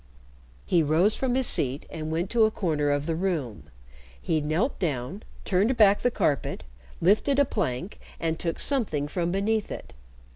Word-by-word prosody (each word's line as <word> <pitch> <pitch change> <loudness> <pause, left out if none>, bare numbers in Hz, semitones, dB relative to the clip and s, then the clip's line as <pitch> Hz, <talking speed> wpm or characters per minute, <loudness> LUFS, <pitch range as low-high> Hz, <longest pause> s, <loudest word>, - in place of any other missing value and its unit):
He 170 - +3
rose 160 +7 +3
from 255 -2 -1
his 260 0 +1
seat 135 - +1
and 155 -1 -5
went 170 +4 -2
to 230 -2 +5
a - - +3
corner 155 -8 -1
of 145 0 0
the 165 - -1
room. 160 - -3 0.5
He 155 - 0
knelt 160 - -1
down, 155 - -2 0.2
turned 205 +7 +2
back 205 -2 +5
the 245 - +3
carpet, 145 - -1 0.4
lifted 215 +10 +3
a 285 - +5
plank, 180 - -3 0.2
and 165 -1 -1
took 165 -1 -2
something 205 - 0
from 170 +2 -2
beneath 210 +3 0
it. - - -8
175 Hz, 170 wpm, -26 LUFS, 155-215 Hz, 0.5 s, to